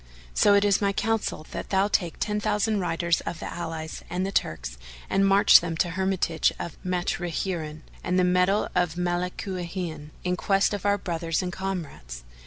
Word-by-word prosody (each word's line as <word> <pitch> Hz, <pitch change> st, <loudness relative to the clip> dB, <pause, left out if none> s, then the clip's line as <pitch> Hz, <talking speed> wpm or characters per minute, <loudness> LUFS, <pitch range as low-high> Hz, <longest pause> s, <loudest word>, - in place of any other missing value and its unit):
So 205 Hz, -, +5 dB
it 200 Hz, 0 st, +4 dB
is 200 Hz, 0 st, +3 dB
my 200 Hz, -1 st, +2 dB
counsel 220 Hz, -7 st, -1 dB
that -, -, -5 dB
thou 195 Hz, +1 st, +3 dB
take 175 Hz, -5 st, 0 dB
ten 210 Hz, -1 st, 0 dB
thousand 210 Hz, 0 st, +1 dB
riders 170 Hz, -1 st, 0 dB
of 170 Hz, -, -5 dB
the -, -, -6 dB
allies 160 Hz, -2 st, -5 dB
and 180 Hz, +2 st, -1 dB
the 195 Hz, -, -2 dB
Turks, 65 Hz, -, -2 dB, 0.3 s
and 195 Hz, 0 st, +3 dB
march 200 Hz, +2 st, +7 dB
them 165 Hz, -1 st, -4 dB
to 175 Hz, -, +1 dB
the -, -, -6 dB
hermitage 185 Hz, -3 st, +1 dB
of 170 Hz, -, -6 dB
Matruhina 175 Hz, -3 st, -2 dB, 0.2 s
and 180 Hz, -, 0 dB
the 185 Hz, -, +4 dB
meadow 180 Hz, +3 st, +2 dB
of 175 Hz, -3 st, +1 dB
Malúkhiná 175 Hz, -2 st, -3 dB
in 180 Hz, 0 st, 0 dB
quest 195 Hz, +2 st, +2 dB
of 205 Hz, 0 st, -2 dB
our 205 Hz, 0 st, +3 dB
brothers 170 Hz, -2 st, -2 dB
and 180 Hz, 0 st, -3 dB
comrades. 160 Hz, -, -5 dB
180 Hz, 180 wpm, -26 LUFS, 165-195 Hz, 0.3 s, march